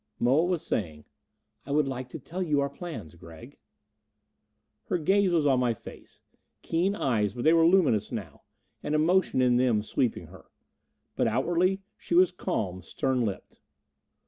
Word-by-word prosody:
Moa 135 +8 +3
was 175 -2 -2
saying, 80 -7 -3 0.6
"I - - -15
would 145 0 +2
like 130 -1 -5
to 160 - -7
tell 170 +6 -7
you 150 -5 +1
our 140 0 -1
plans, 140 - -8
Gregg." 85 - -14 1.3
Her 180 - -1
gaze 190 +4 +2
was 165 -4 +2
on 135 -3 +3
my 120 -2 +1
face. - - -13 0.4
Keen 180 +5 0
eyes, 110 - 0
but 120 - -4
they 160 - +5
were 165 0 +5
luminous 155 - +3
now 95 -10 -7 0.4
an 150 - -2
emotion 160 -3 +2
in 125 -1 +3
them 120 -4 +2
sweeping 120 +2 -1
her. - - -15 0.7
But - - +1
outwardly 175 - +1 0.2
she 170 - -3
was 180 +1 +5
calm, 95 - -3
stern 130 +7 -1
lipped. 100 -4 -5
140 Hz, 160 wpm, -27 LUFS, 115-170 Hz, 1.3 s, they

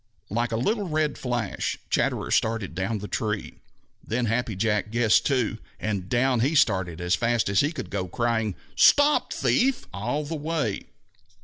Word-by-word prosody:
Like 120 +3 0
a - - 0
little 205 - 0
red 155 -2 -1
flash, 120 -5 -2
Chatterer - - 0
started 110 -5 0
down 95 +5 -2
the 105 0 -6
tree. 105 -1 -3 0.4
Then 120 +2 -1
Happy 115 -1 -1
Jack 105 +1 0
guessed 115 -1 +3
too, 125 -5 0 0.2
and 100 -4 -3
down 125 +1 +2
he 140 +7 +1
started 95 - +2
as 90 0 0
fast 120 +1 +1
as 100 - +2
he 145 - +2
could 165 - -7
go, 95 -2 -2
crying, 110 -1 -1 0.2
"Stop, 290 +1 +5
thief!" 265 0 +1
all 120 +9 -2
the 150 +3 -5
way. 150 -8 -2
115 Hz, 165 wpm, -25 LUFS, 105-140 Hz, 0.4 s, Stop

